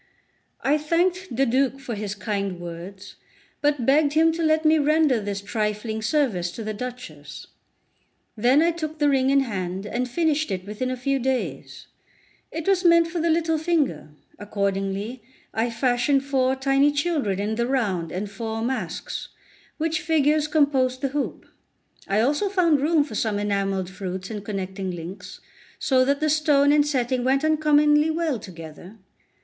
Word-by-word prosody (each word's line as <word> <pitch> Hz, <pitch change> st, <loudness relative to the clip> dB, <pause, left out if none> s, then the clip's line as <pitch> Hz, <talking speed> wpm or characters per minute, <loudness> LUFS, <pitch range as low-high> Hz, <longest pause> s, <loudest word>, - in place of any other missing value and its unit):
I 295 Hz, +3 st, +2 dB
thanked 355 Hz, +4 st, 0 dB
the 270 Hz, +3 st, +3 dB
Duke 265 Hz, +2 st, +1 dB
for 265 Hz, -3 st, -6 dB
his 210 Hz, -1 st, -4 dB
kind 200 Hz, -3 st, -3 dB
words, 175 Hz, +3 st, -9 dB, 0.4 s
but 290 Hz, -4 st, +1 dB
begged 285 Hz, +2 st, +3 dB
him 325 Hz, +1 st, +4 dB
to 330 Hz, +1 st, -4 dB
let 315 Hz, 0 st, +2 dB
me 310 Hz, 0 st, +5 dB
render 300 Hz, -4 st, +3 dB
this 200 Hz, -1 st, -4 dB
trifling 215 Hz, +1 st, -2 dB
service 215 Hz, -, 0 dB
to 225 Hz, -, -6 dB
the 215 Hz, 0 st, -3 dB
Duchess. 215 Hz, -11 st, -8 dB, 0.9 s
Then 250 Hz, +7 st, +4 dB
I 340 Hz, -, +3 dB
took 315 Hz, -2 st, -5 dB
the 295 Hz, -1 st, +3 dB
ring 265 Hz, -1 st, +2 dB
in 275 Hz, 0 st, +4 dB
hand, 190 Hz, -5 st, -4 dB
and 245 Hz, +4 st, -2 dB
finished 310 Hz, +1 st, 0 dB
it 185 Hz, -2 st, -3 dB
within 210 Hz, +5 st, -3 dB
a 255 Hz, -, -3 dB
few 275 Hz, +2 st, 0 dB
days. 260 Hz, 0 st, -3 dB, 0.7 s
It 325 Hz, +1 st, -5 dB
was 390 Hz, -1 st, +3 dB
meant 335 Hz, -1 st, +5 dB
for 345 Hz, +1 st, -3 dB
the 335 Hz, +1 st, +1 dB
little 325 Hz, -1 st, +1 dB
finger; 300 Hz, -, 0 dB, 0.3 s
accordingly 200 Hz, +3 st, -2 dB, 0.3 s
I 225 Hz, +2 st, 0 dB
fashioned 245 Hz, +4 st, +1 dB
four 265 Hz, -1 st, +1 dB
tiny 275 Hz, +2 st, +3 dB
children 290 Hz, -, -1 dB
in 210 Hz, +2 st, -1 dB
the 235 Hz, +2 st, -1 dB
round 200 Hz, -11 st, -1 dB
and 195 Hz, +4 st, -3 dB
four 220 Hz, +2 st, -4 dB
masks, 260 Hz, +2 st, -4 dB, 0.5 s
which 325 Hz, +2 st, -1 dB
figures 305 Hz, -2 st, +2 dB
composed 270 Hz, -4 st, +2 dB
the 275 Hz, -, 0 dB
hoop. 285 Hz, +1 st, -3 dB, 0.6 s
I 200 Hz, +2 st, +2 dB
also 295 Hz, -, +1 dB
found 340 Hz, -7 st, +3 dB
room 310 Hz, 0 st, +3 dB
for 285 Hz, -, -9 dB
some 215 Hz, -1 st, -1 dB
enamelled 195 Hz, -2 st, -1 dB
fruits 190 Hz, 0 st, -6 dB
and 210 Hz, -2 st, -5 dB
connecting 190 Hz, -2 st, -4 dB
links, 175 Hz, +2 st, -8 dB, 0.4 s
so 260 Hz, -2 st, +3 dB
that 280 Hz, +2 st, 0 dB
the 310 Hz, -, +2 dB
stone 290 Hz, -2 st, +4 dB
and 295 Hz, 0 st, +4 dB
setting 255 Hz, -3 st, 0 dB
went 270 Hz, +3 st, +2 dB
uncommonly 300 Hz, 0 st, +4 dB
well 320 Hz, -6 st, -1 dB
together. 175 Hz, +1 st, -11 dB
260 Hz, 165 wpm, -24 LUFS, 205-300 Hz, 0.9 s, me